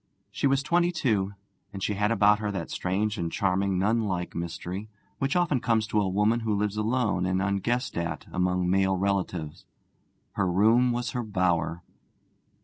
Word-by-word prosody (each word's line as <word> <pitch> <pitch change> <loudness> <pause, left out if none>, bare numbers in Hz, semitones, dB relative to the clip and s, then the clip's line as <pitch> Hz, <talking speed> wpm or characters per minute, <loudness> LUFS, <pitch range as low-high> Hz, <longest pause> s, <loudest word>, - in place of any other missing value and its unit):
She - - 0
was 135 0 +2
twenty 175 +4 +2
two, 105 - 0 0.4
and 100 -1 -6
she 105 - 0
had 105 +1 +1
about 105 -1 +4
her 105 -1 -2
that 85 -4 -4
strange 100 +3 -1
and 85 -1 -2
charming 95 -1 0
nunlike 100 -3 0
mystery 90 +4 -5 0.3
which 135 +3 0
often 170 -7 +2
comes 115 -2 +1
to 105 0 +1
a 95 - 0
woman 105 +5 +2
who 110 -2 -1
lives 105 0 -1
alone 110 -4 0
and 95 0 +1
unguessed 100 +6 -1
at 85 0 -3
among 90 0 0
male 95 +1 +2
relatives. 90 -3 -2 0.7
Her 95 -2 0
room 115 +7 +4
was 120 0 -2
her 125 - -2
bower. 90 -5 0
100 Hz, 165 wpm, -27 LUFS, 90-115 Hz, 0.7 s, about